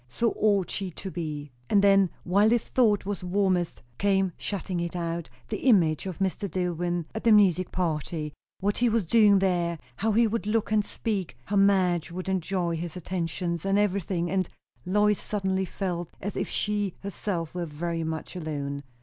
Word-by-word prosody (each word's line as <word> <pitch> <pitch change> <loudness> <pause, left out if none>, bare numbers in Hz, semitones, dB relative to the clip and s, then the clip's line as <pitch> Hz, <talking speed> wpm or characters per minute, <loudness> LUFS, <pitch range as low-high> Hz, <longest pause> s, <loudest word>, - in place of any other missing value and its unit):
So 230 - +1
ought 200 -4 +2
she 195 -2 -2
to 190 +2 -7
be. 150 -4 -5 0.2
And 200 -1 +4
then, 195 -2 +5
while 200 +4 +4
this 235 0 +2
thought 215 -7 +2
was 200 -1 -3
warmest, 180 -2 0 0.2
came, 195 -2 +2
shutting 190 -3 -3
it 170 +1 -3
out, 170 -1 -3 0.2
the 215 - -2
image 175 -7 +4
of 185 - -5
Mr. 195 +1 -1
Dillwyn 175 -1 -1
at 220 - -5
the 230 - +5
music 185 -4 +4
party; 155 -3 -2 0.3
what 205 +2 0
he 245 0 +4
was 225 -3 +1
doing 210 +1 +6
there, 175 -3 +1 0.2
how 220 +2 +1
he 230 +2 +5
would 220 -1 -1
look 215 0 0
and 215 -1 +3
speak, 195 - -3
how 205 - -2
Madge 185 -4 +3
would 185 +2 -5
enjoy 180 -2 0
his 170 +1 -5
attentions, 170 -1 -3
and 195 +1 +2
everything; 190 -4 0
and 190 -2 0 0.4
Lois 210 +2 +3
suddenly 190 -2 -1
felt 175 -3 -3
as 200 +1 -4
if - - -2
she 205 -3 -1
herself 185 -4 -3
were 175 -1 -3
very 165 +2 -3
much 160 +2 -4
alone. 145 -4 -3
185 Hz, 175 wpm, -27 LUFS, 170-205 Hz, 0.4 s, doing